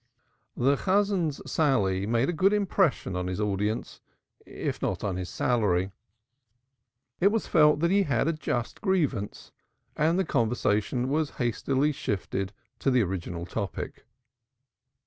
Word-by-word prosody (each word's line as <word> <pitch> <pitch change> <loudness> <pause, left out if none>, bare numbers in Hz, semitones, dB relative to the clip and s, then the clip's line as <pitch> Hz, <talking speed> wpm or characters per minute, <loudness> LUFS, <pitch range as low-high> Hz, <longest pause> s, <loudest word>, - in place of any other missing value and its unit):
The 140 +3 +3
Chazan's 190 -6 +1
sally 105 -10 +1
made 115 +3 +2
a 175 - 0
good 190 +5 +3
impression 190 - +1
on 90 0 -2
his 90 +1 -3
audience 105 +1 -2 0.5
if - - -4
not - - -2
on 100 -3 -1
his 90 -1 -4
salary. 100 -6 +1 1.3
It 185 - +5
was 220 +2 +1
felt 150 -2 +4
that 170 +1 +2
he 200 +1 +4
had 140 - +1
a 165 - +2
just 120 -6 -3
grievance, 150 - -1 0.4
and 160 +3 +2
the 190 - +1
conversation 115 -1 0
was 150 +2 0
hastily 135 +4 +1
shifted 95 -6 -3 0.3
to - - +1
the 125 -3 +4
original 85 -2 -4
topic. 100 0 -5
125 Hz, 135 wpm, -27 LUFS, 100-160 Hz, 1.3 s, It